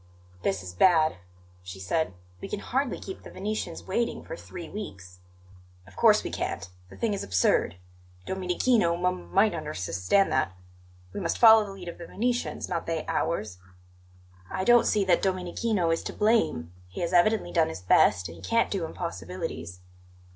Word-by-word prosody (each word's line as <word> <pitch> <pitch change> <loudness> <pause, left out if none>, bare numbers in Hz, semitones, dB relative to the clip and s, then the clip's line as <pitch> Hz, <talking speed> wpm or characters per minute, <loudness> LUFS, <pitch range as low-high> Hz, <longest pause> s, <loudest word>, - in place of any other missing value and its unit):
"This 95 -1 -1
is 90 -1 -8
bad," 160 - +4 0.4
she 90 +1 -9
said. 95 - -1 0.3
"We - - -5
can 210 - -3
hardly 260 +3 -1
keep 190 - -8
the - - -11
Venetians 195 -3 -4
waiting 230 +5 -2
for - - -7
three 360 -7 -9
weeks." 90 - -8 0.7
"Of 100 0 -17
course - - +5
we - - -4
can't; - - -3 0.2
the - - -13
thing 225 -3 0
is 200 - -3
absurd. 95 -2 +2 0.5
Domenichino 185 0 +1
m 170 - -2
might - - +4
unders 90 0 -4
s 85 - -3
stand 195 - +3
that. 130 -8 +1 0.6
We - - -4
must 170 -4 -1
follow 220 -2 +8
the 200 - -8
lead 185 -2 -10
of 170 - -7
the 170 - -8
Venetians, 245 +3 -2
not 170 -2 -3
they 165 -1 -2
ours." 105 - -2 0.9
"I 190 - -2
don't 240 +3 +5
see 205 -2 +2
that 180 -2 +3
Domenichino 185 0 0
is 165 - -1
to - - -4
blame; 210 - +1
he 90 - -7
has 170 +1 -2
evidently 180 +1 +3
done 165 -2 +2
his 80 - -7
best, 90 0 +4
and 85 - -10
he 85 - -14
can't 230 - +1
do 190 -5 -1
impossibilities." 90 - -6
175 Hz, 175 wpm, -27 LUFS, -, 0.9 s, follow